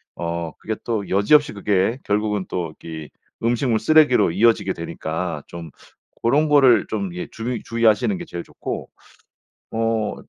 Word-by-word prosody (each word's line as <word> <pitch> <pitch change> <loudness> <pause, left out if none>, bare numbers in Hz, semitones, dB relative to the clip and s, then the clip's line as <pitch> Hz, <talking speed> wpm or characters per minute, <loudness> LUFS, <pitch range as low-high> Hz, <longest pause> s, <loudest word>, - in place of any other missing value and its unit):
어 85 -1 -3
그게 110 - -3
또 110 -4 -2
여지없이 145 +10 +4
그게 100 +2 +1
결국은 105 -1 0
또 85 -3 -3
이 80 -2 -7 0.3
음식물 120 -1 +1
쓰레기로 155 - +4
이어지게 100 -2 +3
되니까 80 -1 -4
좀 85 -2 -8 0.5
고런 145 +6 +3
거를 130 -7 +5
좀 100 -4 -3
예 90 - -4
주의 115 +1 -4
주의하시는 115 - +2
게 175 - -6
제일 85 - -6
좋고 - - -6 0.8
어 115 -1 0
105 Hz, 285 characters per minute, -22 LUFS, 90-115 Hz, 0.8 s, 거를